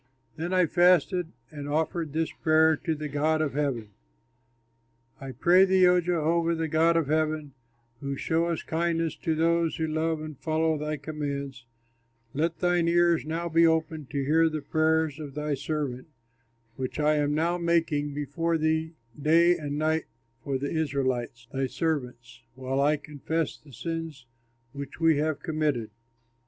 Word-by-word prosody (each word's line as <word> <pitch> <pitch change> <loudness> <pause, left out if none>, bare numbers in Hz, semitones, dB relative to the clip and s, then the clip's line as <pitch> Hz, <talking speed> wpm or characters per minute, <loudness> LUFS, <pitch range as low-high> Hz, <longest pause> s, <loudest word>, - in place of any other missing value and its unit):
Then 170 +3 -4
I 185 -1 +4
fasted 175 +1 +3 0.2
and 145 -2 -7
offered 160 +1 -1
this 160 +2 -1
prayer 160 0 +3
to 160 +1 -2
the 150 0 -5
God 150 +2 +1
of 155 -3 -1
heaven, 135 -7 -2 1.3
"I 135 -1 -7
pray 175 +9 +5
thee, 190 -1 +4
O 180 0 +5
Jehovah, 170 0 +1
the 160 0 -2
God 165 +2 +3
of 165 - +1
heaven, 155 -1 -1 0.5
who 140 0 -4
showest 165 +3 -1
kindness 165 0 -1
to 160 -3 -1
those 165 0 +1
who 160 - -1
love 160 0 -1
and 155 -3 -8
follow 160 0 +1
thy 150 0 -3
commands, 140 -4 -5 0.7
let 160 +4 -1
thine 175 -1 +1
ears 170 -1 +3
now 165 +2 -3
be 165 0 +4
open 160 -2 -1
to 140 -1 -3
hear 160 +3 +4
the 155 -2 -4
prayers 160 -1 +1
of 145 -3 -8
thy 150 0 -2
servant 140 -3 -3 0.7
which 130 +2 -4
I 150 0 +3
am 145 0 +1
now 170 +3 0
making 160 -4 0
before 165 +4 -1
thee 160 +1 0 0.3
day 170 +4 +5
and 145 -3 -4
night 155 +1 0 0.4
for 140 -2 -1
the 140 +2 -4
Israelites, 130 -6 -2
thy 135 0 0
servants, 125 -7 -3
while 130 +1 -2
I 150 +2 +3
confess 150 +2 -3
the 145 - -18
sins 165 -2 -5 0.5
which 140 +1 -8
we 165 -2 +4
have 150 -1 -1
committed. 150 -9 -1
155 Hz, 155 wpm, -27 LUFS, 145-165 Hz, 1.3 s, pray